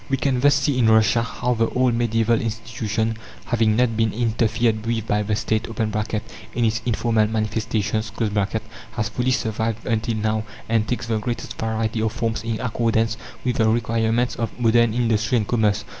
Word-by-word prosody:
We 135 Hz, -, +1 dB
can 130 Hz, -1 st, +1 dB
thus 145 Hz, +2 st, +5 dB
see 140 Hz, -2 st, +1 dB
in 115 Hz, -2 st, +4 dB
Russia 110 Hz, +1 st, +4 dB
how 125 Hz, +2 st, -1 dB
the 115 Hz, -1 st, +1 dB
old 125 Hz, -1 st, +2 dB
medieval 115 Hz, -1 st, +1 dB
institution, 115 Hz, 0 st, -2 dB, 0.3 s
having 115 Hz, -3 st, +2 dB
not 120 Hz, -1 st, +2 dB
been 110 Hz, -1 st, +2 dB
interfered 115 Hz, -1 st, +1 dB
with 115 Hz, -1 st, -1 dB
by 105 Hz, -1 st, +1 dB
the 105 Hz, 0 st, 0 dB
State 110 Hz, +1 st, -1 dB, 0.9 s
(in 120 Hz, -1 st, +2 dB
its 115 Hz, +1 st, 0 dB
informal 115 Hz, -2 st, +2 dB
manifestations), 110 Hz, 0 st, -1 dB, 0.8 s
has 110 Hz, -3 st, -1 dB
fully 125 Hz, +1 st, -1 dB
survived 110 Hz, -3 st, -1 dB
until 115 Hz, 0 st, 0 dB
now, 110 Hz, 0 st, 0 dB, 0.2 s
and 110 Hz, -1 st, +1 dB
takes 120 Hz, -1 st, -2 dB
the 115 Hz, -1 st, 0 dB
greatest 120 Hz, +2 st, -4 dB
variety 110 Hz, 0 st, -1 dB
of 110 Hz, -1 st, +1 dB
forms 115 Hz, -1 st, -2 dB
in 115 Hz, -1 st, -2 dB
accordance 115 Hz, -1 st, 0 dB, 0.3 s
with 125 Hz, 0 st, 0 dB
the 110 Hz, -3 st, +3 dB
requirements 115 Hz, +1 st, +1 dB
of 115 Hz, +1 st, -4 dB
modern 115 Hz, -1 st, +4 dB
industry 115 Hz, 0 st, +1 dB
and 105 Hz, -3 st, -1 dB
commerce. 110 Hz, -3 st, +1 dB
115 Hz, 170 wpm, -22 LUFS, 110-120 Hz, 0.9 s, thus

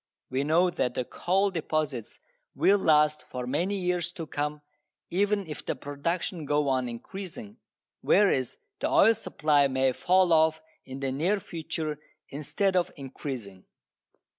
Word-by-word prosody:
We 130 Hz, +2 st, 0 dB
know 170 Hz, +5 st, +3 dB
that 125 Hz, -7 st, -1 dB
the 125 Hz, -, -1 dB
coal 195 Hz, +8 st, +1 dB
deposits 155 Hz, -, -2 dB, 0.4 s
will 200 Hz, +1 st, +4 dB
last 150 Hz, -3 st, +4 dB
for 125 Hz, -1 st, -6 dB
many 170 Hz, +10 st, 0 dB
years 180 Hz, -2 st, -1 dB
to 165 Hz, -, -6 dB
come, 150 Hz, 0 st, -3 dB, 0.5 s
even 200 Hz, +2 st, +1 dB
if 150 Hz, -3 st, -7 dB
the -, -, -2 dB
production 160 Hz, +3 st, -3 dB
go 145 Hz, 0 st, +1 dB
on 130 Hz, -2 st, 0 dB
increasing, 195 Hz, -, -8 dB, 0.4 s
whereas 135 Hz, -, +3 dB, 0.2 s
the -, -, 0 dB
oil 225 Hz, +3 st, +6 dB
supply 150 Hz, -9 st, +2 dB
may 130 Hz, 0 st, +2 dB
fall 180 Hz, +4 st, +3 dB
off 160 Hz, 0 st, +4 dB, 0.3 s
in 135 Hz, +1 st, -7 dB
the 135 Hz, -1 st, -1 dB
near 175 Hz, +10 st, +1 dB
future 160 Hz, -4 st, -5 dB, 0.3 s
instead 185 Hz, +7 st, -1 dB
of 180 Hz, -1 st, +2 dB
increasing. 130 Hz, -, -7 dB
155 Hz, 140 wpm, -28 LUFS, 140-185 Hz, 0.5 s, oil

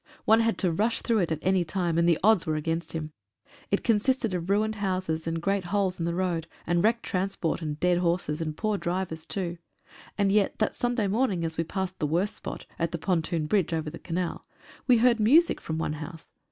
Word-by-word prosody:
One 220 Hz, +1 st, +6 dB
had 230 Hz, 0 st, +1 dB
to 180 Hz, -3 st, +1 dB
rush 215 Hz, +8 st, 0 dB
through 230 Hz, -3 st, +2 dB
it 175 Hz, -4 st, 0 dB
at 160 Hz, -, +1 dB
any 190 Hz, -1 st, +3 dB
time, 170 Hz, 0 st, -1 dB
and 170 Hz, 0 st, +4 dB
the 165 Hz, -, +4 dB
odds 215 Hz, -5 st, +4 dB
were 155 Hz, -, +1 dB
against 165 Hz, +2 st, -2 dB
him. 155 Hz, -1 st, -4 dB, 0.6 s
It 200 Hz, -, 0 dB
consisted 230 Hz, 0 st, +1 dB
of 175 Hz, 0 st, -3 dB
ruined 215 Hz, +2 st, +2 dB
houses, 185 Hz, -5 st, -2 dB
and 165 Hz, 0 st, -1 dB
great 195 Hz, +2 st, 0 dB
holes 195 Hz, -2 st, 0 dB
in 165 Hz, -, -1 dB
the 170 Hz, 0 st, -1 dB
road, 175 Hz, -3 st, -1 dB, 0.2 s
and 175 Hz, 0 st, +1 dB
wrecked 230 Hz, +2 st, +2 dB
transport, 185 Hz, -3 st, -1 dB
and 150 Hz, -2 st, -4 dB
dead 180 Hz, -1 st, +3 dB
horses, 170 Hz, -3 st, 0 dB
and 155 Hz, -1 st, -3 dB
poor 215 Hz, -2 st, 0 dB
drivers 170 Hz, -2 st, -3 dB
too. 175 Hz, -3 st, -3 dB, 0.6 s
And 200 Hz, -1 st, +2 dB
yet 205 Hz, -1 st, +2 dB
that 215 Hz, -, +1 dB
Sunday 245 Hz, -3 st, 0 dB
morning, 200 Hz, -4 st, +1 dB
as 160 Hz, 0 st, -2 dB
we 165 Hz, -, 0 dB
passed 190 Hz, +2 st, -4 dB
the 150 Hz, -, 0 dB
worst 175 Hz, +7 st, 0 dB
spot -, -, -7 dB
(at 170 Hz, -1 st, 0 dB
the 170 Hz, -, -2 dB
pontoon 165 Hz, -2 st, 0 dB
bridge 175 Hz, 0 st, +1 dB
over 160 Hz, -1 st, -2 dB
the 165 Hz, -, -9 dB
canal) 175 Hz, 0 st, -3 dB, 0.4 s
we 250 Hz, -2 st, +6 dB
heard 235 Hz, 0 st, +4 dB
music 295 Hz, +11 st, +4 dB
from 160 Hz, -, -4 dB
one 160 Hz, -1 st, -1 dB
house. 160 Hz, +2 st, -9 dB
180 Hz, 220 wpm, -27 LUFS, 165-205 Hz, 0.6 s, One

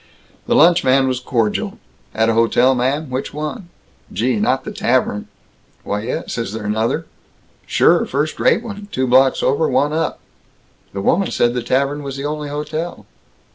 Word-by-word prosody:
The -, -, +2 dB
lunchman 140 Hz, -5 st, +5 dB
was 130 Hz, -1 st, -1 dB
cordial: 115 Hz, -4 st, -1 dB, 0.4 s
"At 110 Hz, 0 st, +2 dB
a 115 Hz, -, +2 dB
hotel, 115 Hz, +3 st, +3 dB
ma'am? 135 Hz, +3 st, -1 dB
Which 130 Hz, +2 st, -4 dB
one? 155 Hz, +4 st, -5 dB, 0.4 s
Gee, 120 Hz, +4 st, 0 dB
not 130 Hz, +6 st, +1 dB
the -, -, -6 dB
Tavern?" 120 Hz, -4 st, 0 dB, 0.6 s
"Why 105 Hz, 0 st, -2 dB
yes. 120 Hz, +1 st, -4 dB
Is 115 Hz, -3 st, -3 dB
there 110 Hz, -1 st, -5 dB
another?" 110 Hz, +2 st, -1 dB, 0.6 s
"Sure. -, -, +3 dB
First 145 Hz, +3 st, -2 dB
rate 230 Hz, -, +3 dB
one, 205 Hz, -3 st, -8 dB
two 130 Hz, -, 0 dB
blocks 130 Hz, +1 st, +4 dB
over, 140 Hz, +4 st, +2 dB
one 145 Hz, +3 st, +1 dB
up." 160 Hz, -, -1 dB, 0.7 s
"The 100 Hz, 0 st, -5 dB
woman 190 Hz, -, +2 dB
said 120 Hz, 0 st, +1 dB
the 125 Hz, -, -2 dB
Tavern 135 Hz, +4 st, 0 dB
was 140 Hz, -1 st, -6 dB
the 140 Hz, -, -4 dB
only 150 Hz, 0 st, -3 dB
hotel." 155 Hz, +3 st, -4 dB
130 Hz, 165 wpm, -19 LUFS, 120-150 Hz, 0.7 s, lunchman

